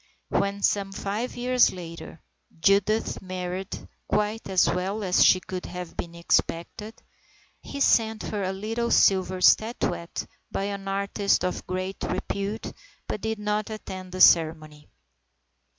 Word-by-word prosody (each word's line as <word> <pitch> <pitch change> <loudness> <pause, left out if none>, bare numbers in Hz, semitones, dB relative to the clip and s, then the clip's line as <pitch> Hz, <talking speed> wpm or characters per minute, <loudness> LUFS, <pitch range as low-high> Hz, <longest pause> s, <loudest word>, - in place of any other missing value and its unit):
When, 200 0 0
some 195 -1 +1
five 205 +5 -3
years 250 0 +4
later, 165 -3 -9 0.4
Judith 200 +5 +2
married, 185 0 -5 0.2
quite 210 +1 -1
as 190 -1 +4
well 195 +4 -1
as 185 0 +5
could 185 -1 -5
have 180 -1 -7
been 170 0 -5
expected, 170 +5 -1 0.7
he 280 - -7
sent 220 -4 +3
her 210 - -3
a 190 -1 -1
little 225 +5 -2
silver 185 -1 +3
statuette 180 -6 +2 0.3
by - - -2
an 200 -1 -4
artist 200 0 +1
of 180 - -3
great 185 +1 -4
repute, 200 +3 -3 0.3
but 210 - -4
did 220 0 -2
not 210 0 -1
attend 185 -4 -7
the 185 +1 -3
ceremony. 155 -3 +4
195 Hz, 130 wpm, -26 LUFS, 180-210 Hz, 0.7 s, as